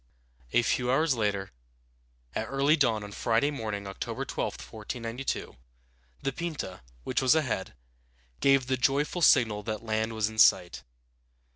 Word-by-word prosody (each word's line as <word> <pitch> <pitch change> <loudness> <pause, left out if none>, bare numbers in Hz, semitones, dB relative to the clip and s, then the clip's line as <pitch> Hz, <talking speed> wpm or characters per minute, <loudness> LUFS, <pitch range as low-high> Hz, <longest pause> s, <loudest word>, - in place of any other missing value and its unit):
A 120 - +3
few 125 +2 0
hours 150 +3 +3
later, 105 -4 -1 0.8
at 110 - -2
early 140 +4 +3
dawn 115 -8 +1
on 105 - -8
Friday 115 +7 +1
morning, 110 -7 -4
October 95 0 -5
12, - - -3
1492, 115 +4 -5 0.7
the 135 - -1
Pinta, 155 - -5 0.2
which - - 0
was 130 +3 +5
ahead, 120 - -1 0.6
gave 135 -1 +4
the 130 +1 0
joyful 145 +7 +1
signal 110 -9 +5
that 110 +1 -4
land 110 +1 -1
was 110 -1 0
in 110 0 -6
sight. 90 -10 +4
115 Hz, 140 wpm, -28 LUFS, 105-135 Hz, 0.8 s, was